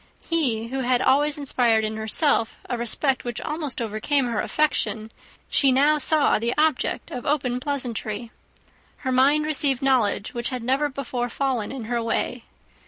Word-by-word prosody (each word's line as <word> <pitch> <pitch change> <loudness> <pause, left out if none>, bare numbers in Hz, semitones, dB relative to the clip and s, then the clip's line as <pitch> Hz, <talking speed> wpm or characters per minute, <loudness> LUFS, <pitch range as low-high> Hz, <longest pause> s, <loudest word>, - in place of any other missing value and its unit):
He, 245 -9 0
who 270 +2 -3
had 250 -1 +2
always 285 +3 +2
inspired 240 -6 +1
in 215 0 -4
herself 220 +3 +1
a 245 - -2
respect 245 +3 0
which 240 -2 -4
almost 300 -4 -3
overcame 235 +5 0
her 235 -3 -1
affection, 250 -7 0 0.4
she 275 -2 +3
now 290 +4 +3
saw 300 -2 +4
the 235 +2 -1
object 310 -3 0
of 245 - -5
open 260 -4 0
pleasantry. 245 -5 -4 0.7
Her 260 - 0
mind 280 +4 +3
received 280 -3 +1
knowledge 255 -2 +1
which 235 -1 -3
had 255 -3 -5
never 270 +4 +1
before 250 -3 -4
fallen 255 -4 -2
in 265 -3 -6
her 235 +1 -2
way. 230 +1 -2
255 Hz, 160 wpm, -24 LUFS, 235-285 Hz, 0.7 s, saw